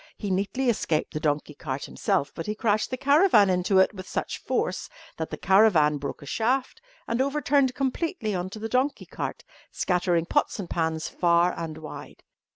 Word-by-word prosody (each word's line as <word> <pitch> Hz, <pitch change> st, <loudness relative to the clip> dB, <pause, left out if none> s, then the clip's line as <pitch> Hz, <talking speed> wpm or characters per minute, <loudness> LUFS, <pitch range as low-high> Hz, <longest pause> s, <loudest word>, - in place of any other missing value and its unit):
He 205 Hz, -3 st, -4 dB
neatly 205 Hz, +8 st, -1 dB
escaped 165 Hz, -9 st, 0 dB
the 155 Hz, -, -2 dB
donkey 150 Hz, 0 st, -1 dB
cart 135 Hz, -1 st, -5 dB
himself, 145 Hz, -, -1 dB
but 165 Hz, -, -6 dB
he 210 Hz, -, -2 dB
crashed 215 Hz, -1 st, +1 dB
the 255 Hz, -, -3 dB
caravan 280 Hz, -, +5 dB
into 180 Hz, +2 st, +2 dB
it 190 Hz, +3 st, +4 dB
with 185 Hz, -2 st, -9 dB
such -, -, -3 dB
force -, -, -2 dB, 0.3 s
that -, -, -3 dB
the -, -, -5 dB
caravan 180 Hz, -8 st, +4 dB
broke 140 Hz, +1 st, -6 dB
a -, -, -10 dB
shaft 250 Hz, -, -1 dB, 0.3 s
and 230 Hz, +2 st, 0 dB
overturned 280 Hz, -2 st, +2 dB
completely 270 Hz, -, -2 dB
on 180 Hz, 0 st, -2 dB
to 200 Hz, -, -8 dB
the 220 Hz, +1 st, -4 dB
donkey 260 Hz, +4 st, 0 dB
cart, -, -, -5 dB, 0.3 s
scattering 175 Hz, -2 st, 0 dB
pots -, -, 0 dB
and 195 Hz, -5 st, -6 dB
pans 160 Hz, -1 st, -1 dB
far 175 Hz, 0 st, +2 dB
and 160 Hz, -2 st, -5 dB
wide. 155 Hz, -1 st, -10 dB
195 Hz, 180 wpm, -26 LUFS, 165-250 Hz, 0.3 s, caravan